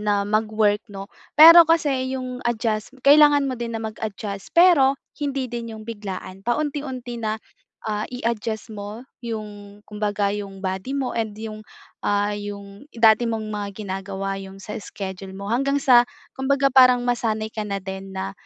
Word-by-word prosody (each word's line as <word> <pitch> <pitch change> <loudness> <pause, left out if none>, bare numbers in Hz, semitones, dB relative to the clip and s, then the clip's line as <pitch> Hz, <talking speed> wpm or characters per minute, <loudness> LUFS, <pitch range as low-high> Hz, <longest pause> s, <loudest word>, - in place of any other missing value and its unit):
na 205 -1 +1
mag-work 215 0 +1
'no, 195 -1 -7 0.3
pero 330 +1 +10
kasi 265 -5 +1
yung 255 -1 -5
adjust 225 +1 -2
kailangan 290 0 +7
mo 255 -3 -3
din 230 -1 -3
na - - -5
mag-adjust 210 -2 -5
pero 290 -7 +6 0.2
hindi 270 -4 -2
din 230 -2 -5
yung 215 - -10
biglaan, 195 -4 -7
paunti-unti 255 -1 -3
na, 215 0 -1 0.5
ah, 210 0 -2
i-adjust 225 -2 -3
mo 210 +4 -7 0.2
yung 210 -3 -7
kumbaga 205 -1 -1
yung 195 -2 -7
body 190 +7 -3
mo 265 -2 -2
and 220 -2 -1
yung, 215 -1 -7 0.4
ah, 205 0 +1
yung 200 +2 -8
dati 225 0 +5
mong 220 -1 -3
mga 205 -1 -4
ginagawa, 195 0 -4
yung 195 0 -10
sa 210 +3 -7
schedule 190 -1 -7
mo 200 +1 -6
hanggang 275 +3 +1
sa 245 -3 +6 0.3
kumbaga 275 +1 +2
parang 250 -2 +6
masanay 220 -3 -1
ka 220 - -5
na 200 0 -2
din 190 0 -7
na, 190 +1 -3
220 Hz, 155 wpm, -23 LUFS, 205-255 Hz, 0.5 s, pero